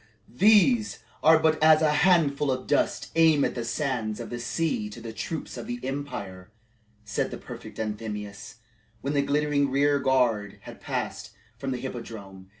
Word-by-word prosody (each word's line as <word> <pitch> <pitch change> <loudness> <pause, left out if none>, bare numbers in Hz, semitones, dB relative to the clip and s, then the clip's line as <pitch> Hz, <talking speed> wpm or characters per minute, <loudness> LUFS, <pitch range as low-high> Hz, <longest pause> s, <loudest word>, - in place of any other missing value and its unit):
"These 215 - +4 0.2
are 160 +1 +7
but 155 -1 +1
as 155 0 +6
a 155 - +4
handful 150 -4 +3
of 130 0 -3
dust - - 0
amid 160 -3 +4
the 120 - -4
sands 120 -3 -2
of - - -7
the 120 - -4
sea 120 -3 -1
to 105 - -10
the 115 -1 -8
troops 160 +7 -5
of - - -7
the 245 0 -4
empire," 100 -9 -5 0.6
said 105 - -1
the - - -6
prefect - - -10
Anthemius, 105 -2 -5 0.5
when 140 +4 -2
the 140 - +3
glittering 145 0 +1
rear 140 +1 +2
guard 125 -7 +1
had - - -12
passed - - -4 0.2
from 135 - -5
the 130 - -2
Hippodrome. 105 -7 -8
135 Hz, 160 wpm, -26 LUFS, 110-155 Hz, 0.6 s, are